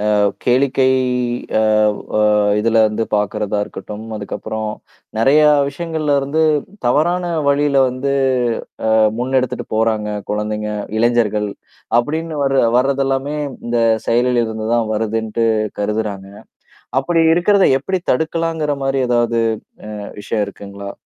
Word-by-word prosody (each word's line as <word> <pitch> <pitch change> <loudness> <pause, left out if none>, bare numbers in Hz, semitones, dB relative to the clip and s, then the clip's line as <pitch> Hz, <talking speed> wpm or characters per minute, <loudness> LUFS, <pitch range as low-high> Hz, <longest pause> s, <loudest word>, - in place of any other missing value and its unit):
அ - - +2 0.3
கேளிக்கை 130 +1 +3 0.7
அவ் 105 -1 +2 0.2
அ - - +3 0.4
இதுல 115 +1 +1
வந்து 105 +1 -2
பார்கறதா 105 0 -1
இருக்கட்டும். 105 +1 -8
அதுக்கப்புறம் 110 +1 -4 0.5
நிறையா 150 +6 +5 0.2
விஷயங்கள்ல 160 -2 -1
இருந்து 145 +4 0 0.4
தவறான 175 +8 +2 0.3
வழியில 140 0 +2
வந்து 130 +2 -2 0.8
அ - - +4 0.2
முன்னெடுத்துட்டு 130 0 -1
போறாங்க 110 -1 +1 0.2
குழந்தைங்க 105 0 -2 0.3
இளைஞர்கள். 110 -3 +1 0.5
அபடின்னு 155 +4 -3
வர 135 - +1 0.2
வரதெல்லாமே 135 +2 0 0.3
இந்த 120 0 0 0.3
செயலில் 120 +1 +2
இருந்து 110 -1 -5
தான் 115 -2 +1
வருதுன்ட்டு 110 +1 -1 0.3
கருதுறாங்க. 105 -2 -2 0.7
அப்படி 165 +4 +1
இருக்கிறத 195 +3 +3 0.2
எப்படி 185 +6 -2
தடுக்கலாங்கிற 160 +1 -1
மாரி 135 0 0
ஏதாவது 120 -1 +1 0.7
அ - - -8
விஷயம் 105 0 -1
இருக்குங்களா? 100 0 -8
120 Hz, 110 wpm, -18 LUFS, 110-140 Hz, 0.8 s, நிறையா